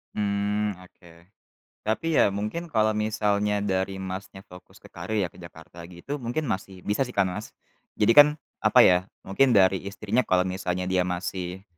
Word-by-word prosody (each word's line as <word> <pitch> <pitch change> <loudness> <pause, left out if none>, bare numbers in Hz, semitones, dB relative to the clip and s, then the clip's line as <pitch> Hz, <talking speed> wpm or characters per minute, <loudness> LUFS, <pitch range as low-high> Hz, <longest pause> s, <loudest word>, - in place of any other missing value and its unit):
Mmm 105 0 -1
oke. 85 -2 -18 0.6
Tapi 155 +9 +1
ya - - +6
mungkin 105 - -4
kalau 110 -8 +2
misalnya 105 -1 0
dari 95 -1 -1
Mas-nya 95 0 -7
fokus 90 -1 -16
ke - - -17
karir 110 - -5
ya, 90 - -4
ke - - -17
Jakarta 85 0 -13
gitu, 90 +12 -7
mungkin 120 +5 -3
masih 95 -7 -5
bisa 105 +6 0
sih 125 - -11
kan 95 -2 +2
Mas? 105 +4 -8 0.4
Jadi 105 +2 +3
kan 145 +4 +9 0.3
apa - - +5
ya, 90 +1 +4 0.2
mungkin 120 +6 +2
dari 95 -1 +4
istrinya 105 +5 -1
kalau 90 0 +3
misalnya 90 -1 -3
dia 90 0 0
masih 90 +1 -4
100 Hz, 170 wpm, -25 LUFS, 90-110 Hz, 0.6 s, kan